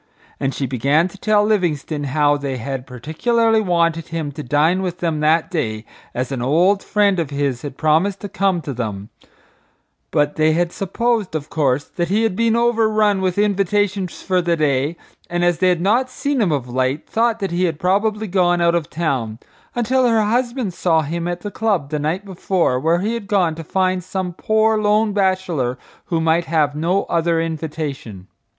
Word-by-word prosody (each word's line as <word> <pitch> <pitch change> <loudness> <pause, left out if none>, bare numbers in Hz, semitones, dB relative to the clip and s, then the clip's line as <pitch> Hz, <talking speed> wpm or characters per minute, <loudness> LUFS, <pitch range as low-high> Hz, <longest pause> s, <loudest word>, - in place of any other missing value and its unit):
And 135 - 0
she 135 - -3
began 140 +7 +2
to 200 - -14
tell 210 0 +3
Livingstone 160 -8 0
how 145 +1 +2
they 140 -2 -3
had 130 +2 -5
particularly 220 - +1
wanted 170 -4 +1
him 160 -3 -4
to 150 +2 -7
dine 150 +7 +2
with 180 -2 -3
them 165 -4 -1
that 155 +2 +2
day 110 -10 -2 0.3
as 125 +2 -2
an 130 -3 -3
old 175 +10 +3
friend 205 -3 +2
of 160 -5 -2
his 140 -4 -2
had 140 -2 -7
promised 165 +6 +2
to 205 - -4
come 190 -2 0
to 145 -3 -5
them, 105 -4 -5 1.0
but 145 +1 0
they 155 0 +3
had 175 +1 0
supposed, 215 -1 -1
of 150 -2 -4
course, 140 -3 +1
that 175 +3 -3
he 210 +4 +2
had 225 -5 0
been 230 +1 +2
overrun 220 -4 +2
with 185 -1 -1
invitations 200 -1 0
for 185 -1 +1
the 170 -1 0
day 145 +1 0 0.3
and, 175 0 0
as 175 -2 +1
they 185 0 +4
had 175 -2 +1
not 235 +7 +2
seen 280 0 -1
him 190 -6 +2
of 135 -4 -1
late, 130 +4 -1
thought 230 0 +1
that 195 -4 -3
he 175 +2 +1
had 165 -4 -1
probably 210 +5 0
gone 175 -3 +2
out 170 0 +3
of 170 -3 -1
town, 130 -9 -2 0.4
until 250 +2 +2
her 225 -2 +3
husband 240 -2 -1
saw 165 -2 +2
him 170 +3 -3
at 175 0 -3
the 205 - -5
club 195 -10 -1
the 150 - -1
night 165 +7 -2
before 185 -7 0
where 165 +5 +1
he 215 +4 -1
had 230 -4 -5
gone 185 -5 +2
to 165 +1 -8
find 185 +2 0
some 185 0 -4
poor 220 +3 +2
lone 210 0 +2
bachelor 185 -10 0 0.3
who 165 - -1
might 165 +1 +2
have 155 -3 +1
no 170 +6 0
other 165 0 0
invitation. 150 - -5
175 Hz, 190 wpm, -20 LUFS, 150-200 Hz, 1.0 s, they